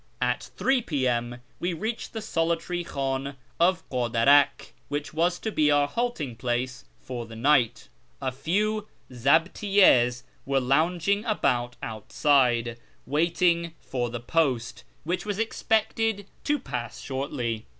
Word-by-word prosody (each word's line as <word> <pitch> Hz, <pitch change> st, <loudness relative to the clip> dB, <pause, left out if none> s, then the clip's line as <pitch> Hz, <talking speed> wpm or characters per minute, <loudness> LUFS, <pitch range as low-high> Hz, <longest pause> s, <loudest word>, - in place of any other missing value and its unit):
At -, -, -1 dB
3 265 Hz, -1 st, +2 dB
p.m. 120 Hz, -, -1 dB, 0.2 s
we 175 Hz, +1 st, -1 dB
reached 220 Hz, +8 st, -4 dB
the 220 Hz, -2 st, -5 dB
solitary 170 Hz, -1 st, -1 dB
Ichdn 135 Hz, -2 st, -3 dB, 0.2 s
of 180 Hz, +1 st, +2 dB
Kadarak, 125 Hz, +3 st, +3 dB
which 145 Hz, +1 st, -4 dB
was 175 Hz, +3 st, +1 dB
to 220 Hz, -, -4 dB
be 150 Hz, -6 st, +3 dB
our 145 Hz, -1 st, +4 dB
halting 155 Hz, -, -2 dB
place 125 Hz, +1 st, -2 dB
for 120 Hz, -3 st, -6 dB
the 115 Hz, -, -10 dB
night. 125 Hz, -1 st, +2 dB, 0.3 s
A 130 Hz, -1 st, -2 dB
few 210 Hz, +10 st, -1 dB, 0.2 s
zdbtiyTjds 140 Hz, -, +3 dB, 0.2 s
were 135 Hz, 0 st, +1 dB
lounging 165 Hz, +9 st, +1 dB
about 125 Hz, -, 0 dB
outside, 120 Hz, +1 st, +1 dB, 0.3 s
waiting 170 Hz, +2 st, +1 dB
for 120 Hz, -2 st, -3 dB
the 120 Hz, 0 st, -5 dB
post, 125 Hz, -2 st, 0 dB, 0.2 s
which 175 Hz, +4 st, -2 dB
was 205 Hz, -2 st, -3 dB
expected 220 Hz, -1 st, 0 dB, 0.2 s
to 295 Hz, 0 st, +2 dB
pass 125 Hz, -, -5 dB
shortly. 120 Hz, -5 st, -3 dB
145 Hz, 125 wpm, -26 LUFS, 125-180 Hz, 0.3 s, our